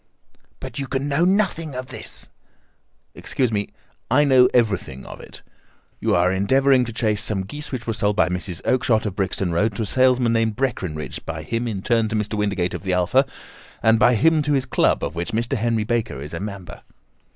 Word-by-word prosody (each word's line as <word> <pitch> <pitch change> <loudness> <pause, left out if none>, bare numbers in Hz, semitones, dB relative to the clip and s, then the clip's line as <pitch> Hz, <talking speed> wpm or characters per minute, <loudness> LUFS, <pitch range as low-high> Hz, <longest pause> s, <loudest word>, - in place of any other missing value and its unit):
"But - - -7
you 135 - -3
can 135 +1 -2
know 145 +4 +2
nothing 180 -6 0
of 130 0 -6
this?" - - -5 0.9
"Excuse 125 -3 -1
me, 105 -1 -1 0.4
I 135 +5 +4
know 130 -3 +5
everything 100 - 0
of - - -10
it. - - -12 0.6
You - - +1
are 90 +1 +3
endeavouring 130 +7 +3
to 115 - -6
trace 110 -2 0
some 100 -3 -1
geese 145 +10 -6
which 125 -3 -4
were 115 - -1
sold 105 -1 0
by - - +3
Mrs. 90 -1 -3
Oakshott, 120 -3 +2
of 100 -3 -3
Brixton 95 -2 -1
Road, 100 +5 +1
to 110 - -2
a - - -2
salesman 125 +1 +3
named 115 -1 +1
Breckinridge, 95 - -3
by - - -5
him 115 +1 -2
in 100 -4 -4
turn 115 -3 +1
to 110 - -2
Mr. 105 0 -2
Windigate, 100 -4 -1
of - - -5
the 95 -1 -2
Alpha, 95 +10 +2 0.6
and 110 0 +4
by 125 +1 +5
him 160 +7 +3
to 150 0 0
his 135 -2 +1
club, 130 - +1
of - - -2
which 85 +4 -4
Mr. 120 +4 0
Henry 115 -1 0
Baker 115 - -2
is 75 +3 -8
a 85 - -4
member." 100 -4 -7
115 Hz, 205 wpm, -22 LUFS, 100-130 Hz, 0.9 s, know